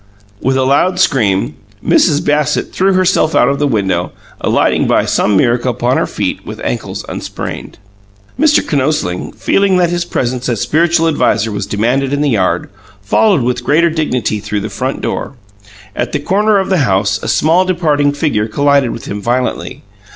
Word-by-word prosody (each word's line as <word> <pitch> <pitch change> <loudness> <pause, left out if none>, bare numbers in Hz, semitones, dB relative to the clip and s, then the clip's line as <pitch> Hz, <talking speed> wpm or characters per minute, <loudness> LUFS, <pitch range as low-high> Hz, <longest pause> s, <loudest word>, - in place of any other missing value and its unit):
With 130 0 +1
a 130 - +2
loud 160 +8 +2
scream, 105 - +1 0.3
Mrs. 150 -4 +3
Bassett 150 0 0
threw 190 +1 +2
herself 185 -4 +2
out 125 - +4
of 140 - -1
the 145 - +1
window, 95 -7 -1 0.3
alighting - - +1
by - - +2
some 105 -2 +1
miracle 120 +3 +1
upon 125 +1 0
her - - 0
feet - - -3
with - - -8
ankles - - -4
unsprained. - - -6 0.6
Mr. 300 -1 +3
Kinosling, 140 - -1
feeling 195 -2 +2
that 175 -1 +2
his 175 0 -1
presence 125 -6 -2
as 115 -4 -1
spiritual 165 +4 +2
adviser 115 -8 +1
was 105 - -4
demanded 125 +6 0
in 145 - 0
the 150 - +1
yard, 95 -5 0 0.3
followed 170 - +2
with 125 0 -1
greater 165 +5 +2
dignity 125 -9 -1
through 105 0 -3
the 105 - -4
front 130 +2 -3
door. - - -4 0.6
At - - -3
the - - 0
corner 205 +7 +2
of 190 - -1
the 190 -3 +2
house 100 -3 +1
a - - -5
small 165 +4 +3
departing 155 -6 +1
figure 145 -7 -1
collided 140 +3 +2
with 115 - -7
him 100 +1 -5
violently. 125 +3 -2
140 Hz, 175 wpm, -14 LUFS, 115-165 Hz, 0.6 s, out